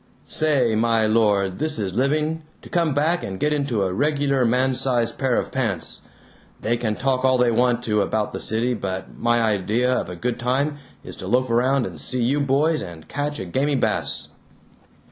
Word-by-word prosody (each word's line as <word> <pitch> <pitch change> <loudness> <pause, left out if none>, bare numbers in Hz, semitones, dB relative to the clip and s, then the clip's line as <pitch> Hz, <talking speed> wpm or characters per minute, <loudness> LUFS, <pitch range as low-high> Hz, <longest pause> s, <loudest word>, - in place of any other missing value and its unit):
Say, 140 -7 +2
my 115 0 +2
Lord, 105 -4 +2
this 155 0 -1
is 100 -4 -2
living, 150 +6 0 0.2
to - - -12
come 165 -5 +1
back 160 +4 +1
and 95 -1 -5
get 150 0 +1
into 140 -8 0
a 95 -1 -1
regular 140 +2 +1
man 130 +3 +2
sized 120 -3 0
pair 130 -3 +1
of - - -2
pants. 110 -10 -2 0.6
They 115 +2 0
can 115 -3 -1
talk 130 +1 0
all 130 -1 +4
they 125 -1 +3
want 120 +1 +2
to 105 -3 +1
about 105 +1 -1
the - - -4
city, 115 +3 0
but 95 -4 -5
my 120 0 +2
idea 110 +4 +1
of - - -1
a 90 - -6
good 120 +7 -3
time 140 +4 0 0.2
is - - -9
to 95 - -7
loaf 125 +3 +1
around 125 +2 +2
and 85 -5 -7
see 120 - -1
you 135 +5 +2
boys 145 +3 +2
and 85 -4 -9
catch 145 +1 -3
a 95 - -5
gamey 140 +11 0
bass!" - - -1
125 Hz, 195 wpm, -23 LUFS, 110-140 Hz, 0.6 s, all